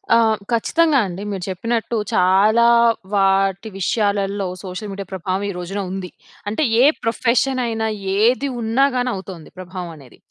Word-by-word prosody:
ఆహ్, 225 -2 +3
ఖచ్చితంగా 295 +6 +2
అండి. 185 +2 -6
మీరు 190 -2 -4
చెప్పినట్టు 230 +5 -2 0.2
చాలా 205 +6 +4 0.5
వాటి 195 +1 +2
విషయాలల్లో, 200 0 0
సోషల్ 195 +3 -6
మీడియా 195 -1 -6
ప్రభావం 190 +1 -3
ఈ - - -2
రోజున 180 +3 -5
ఉంది. 190 -1 -5 0.4
అంటే, 220 +9 -1 0.2
ఏ - - +6 0.2
ప్రొఫెషనైయినా 235 -1 0 0.3
ఏది 240 +7 +2
ఉన్నాగాని 250 +2 +1
అవుతొంది. 185 -4 -9
ప్రభావం 185 -1 -7
అనేది. 135 -5 -16
200 Hz, 130 wpm, -20 LUFS, 190-230 Hz, 0.5 s, ఏ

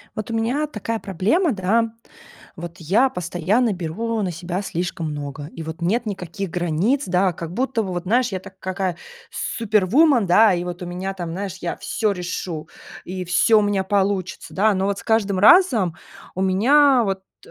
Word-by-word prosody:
Вот 215 +1 -5
у - - -2
меня 245 +7 0
такая 225 -4 -4
проблема, 215 - +1
да. 220 +3 +1 0.6
Вот 170 0 -8
я 195 - +3
постоянно 180 +5 0
беру 200 +6 -3
на 185 -3 -2
себя 175 +3 -4
слишком 175 -3 -3
много, 145 0 -6
и 165 +1 -9
вот 160 +1 -7
нет 225 +8 0
никаких 195 -1 -5
границ, 180 - 0
да. 180 +1 +2
Как 170 0 -7
будто 250 0 0
бы 195 - -4
вот, 175 0 -4
знаешь, 240 +4 +1
я 190 - -3
так, 190 0 -14
какая 185 -2 -3 0.3
супервуман, 230 - +2
да, 210 +4 +6
и 175 0 -2
вот 175 0 -6
у - - -5
меня 185 +2 -4
там, 175 -3 -5
знаешь, 195 +1 -5
я 170 - -3
всё 215 -3 -1
решу, 175 -3 -5 0.4
и 185 +1 -5
всё 180 +5 +4
у - - +1
меня 205 -2 0
получится, 190 -1 -1
да. 210 +2 +3
Но 190 0 0
вот 200 0 -1
с - - -8
каждым 205 -4 +1
разом 220 - +5 0.4
у 185 - -4
меня 255 +8 +4
вот, 195 -1 -2 0.3
э, - - -15
190 Hz, 185 wpm, -22 LUFS, 175-225 Hz, 0.6 s, да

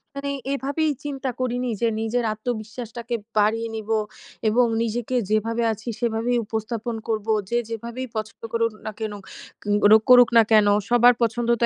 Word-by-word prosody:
মানে 280 0 -3 0.2
এভাবেই 280 +3 -1
চিন্তা 275 -2 -3
করিনি 250 0 -1
যে 230 - +3
নিজের 230 +2 -1
আত্মবিশ্বাসটাকে 230 +1 -5 0.2
বাড়িয়ে 225 +2 +2
নিবো। 220 0 -1 0.5
এবং 245 +3 +4 0.2
নিজেকে 235 +2 -2
যেভাবে 225 +2 0
আছি 220 +3 -13
সেভাবেই 235 +1 0
উপস্থাপন 225 +2 -3
করবো। 220 -1 -1 0.2
যে 235 - +1
যেভাবেই 235 +3 -5
পছন্দ 215 0 -5
করুন 230 0 +1
না 215 - -3
কেনো, 210 -2 -4 0.5
কেন 205 0 +4 0.2
করুন 245 -1 +9
না 225 - +8
কেনো। 210 -2 +6 0.2
সবার 240 +1 +6
পছন্দ 230 +1 0
তো - - +5
230 Hz, 150 wpm, -23 LUFS, 220-245 Hz, 0.5 s, করুন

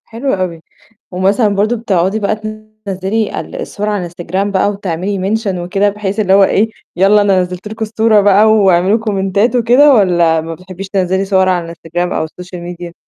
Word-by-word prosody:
حلو 240 +4 -3
أوي، 180 -4 -3 0.5
ومثلًا 195 +5 +1
برضه 215 +4 +1
بتقعدي 200 -2 0
بقى 210 +1 0
تنزّلي 215 -1 -4
ال - - -8
الصور 210 +1 -4
على 210 - -1
الإنستجرام 180 +2 -3
بقى 195 +1 +1
وتعملي 195 0 -3
mention 215 -4 -2
وكده 195 +4 0
بحيث 205 0 -4
اللي 190 -3 +2
هو 195 0 +6
إيه، 210 +3 +2 0.3
"يالّا 195 +3 +4
أنا 195 -2 +3
نزلت 180 +2 -6
لكم 220 +1 -4
الصورة 220 -1 +2
بقى، 205 +1 +4
واعملوا 200 -2 +3
كومنتات."، 200 +2 0
وكده 250 +5 +5
والّا 175 -7 +3
ما 165 +1 -6
بتحبيش 185 +2 -9
تنزلي 190 0 0
صور 190 -1 +2
على 180 -2 0
الإنستجرام 170 +1 -4
أو - - -1
السوشيال 180 +2 -9
ميديا؟ 175 0 -8
195 Hz, 175 wpm, -14 LUFS, 180-215 Hz, 0.5 s, هو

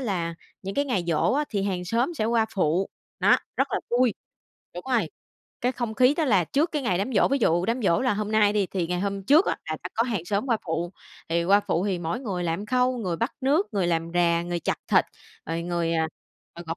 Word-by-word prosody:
là 175 -9 -2 0.3
những 195 +1 -5
cái 285 - +1
ngày 220 -10 -1
giỗ 165 +7 +2
á 295 +3 +1
thì 200 -3 -1
hàng 185 -3 -2
xóm 235 - 0
sẽ 220 - -1
qua 225 0 +2
phụ, 180 0 +1 0.3
đó, - - +6 0.2
rất - - +1
là - - 0
vui. 245 -2 +3 0.6
Đúng 175 - -7
rồi, 220 -10 +2 0.5
cái 250 +1 +1
không 240 -4 -3
khí 255 +4 +4
đó 320 - 0
là 200 - +3
trước 295 - 0
cái 300 -3 -1
ngày 185 -8 +1
đám 225 +7 -2
giỗ. - - +4
Ví 275 - +1
dụ 175 -7 +2
đám 235 +2 -1
giỗ 170 -5 +3
là 255 -4 +1
hôm 210 +1 -3
nay 210 -1 +4
đi, 205 -2 +1
thì 180 -2 -2
ngày 180 +1 -2
hôm 200 0 -2
trước 295 - +5
á - - 0
sẽ - - -1 0.2
có 225 - +2
hàng 220 -9 -2
xóm 200 +6 -1
qua 235 -4 +2
phụ. 170 +2 -2 0.4
Thì 170 +1 +1
qua 200 +3 +5
phụ 185 -1 -1
thì 190 -3 0
mỗi 170 +7 -3
người 190 -8 -3
làm 170 +5 -2
khâu, 255 +2 +2
người 180 -7 -2
bắc 230 +8 -1
nước, 295 +9 +2
người 195 -4 +1
làm 165 -1 0
rà, 170 -1 +3
người 175 0 -3
chặt - - -1
thịt, - - +4 0.4
rồi 165 +1 -2
người, 170 -1 -1
à, 160 -1 +1 0.5
à, 170 - -8
gọt 165 +1 -3
200 Hz, 245 wpm, -25 LUFS, 175-240 Hz, 0.6 s, đó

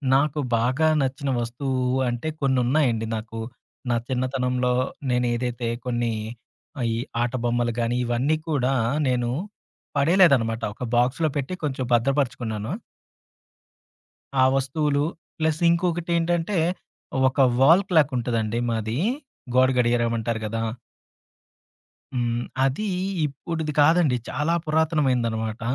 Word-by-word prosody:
నాకు 150 +2 +1 0.2
బాగా 130 +7 +2
నచ్చిన 135 +1 -2
వస్తువు 130 +2 -2 0.2
అంటే, 120 +6 -3
కొన్ని 130 -2 +2
ఉన్నాయండి 120 -5 +1
నాకు. 115 +1 -6 0.5
నా - - +3
చిన్నతనంలో 125 -1 0 0.4
నేనేదైతే 120 -1 -1 0.2
కొన్ని, 120 -2 0 0.7
ఆయి 115 -1 0 0.3
ఆట 120 0 -2
బొమ్మలు 120 0 +1
గానీ, 120 +1 0
ఇవన్నీ 125 +6 +1
కూడా, 135 -3 +1 0.4
నేను 120 -1 0 0.7
పడేయలేదనమాట. 140 -8 +4
ఒక - - -7
బాక్స్‌లో 130 +7 +2
పెట్టి 140 +6 -3
కొంచెం 130 -3 -2
భద్రపరుచుకున్నాను. 120 -3 0 1.7
ఆ - - +7
వస్తువులు 140 +2 0 0.4
ప్లస్ 160 0 0
ఇంకొకటేంటంటే, 170 +1 0 0.7
ఒక 130 - -8 0.2
వాల్ 165 +9 +6
క్లాక్ 155 -5 +4
ఉంటదండి 115 -1 -1
మాదీ, 110 +1 -2 0.6
గోడ 130 0 +6
గడియారం 120 -1 +2
అంటారు 115 0 -2
కదా! 115 +1 -3 1.5
హ్మ్. 120 -1 0 0.2
అది 135 +11 0 0.4
ఇప్పుడుది 155 +2 -4
కాదండి, 155 -3 +4
చాలా 150 +4 0
పురాతనమైందనమాట. 130 -9 0
130 Hz, 105 wpm, -24 LUFS, 120-150 Hz, 1.7 s, ఆ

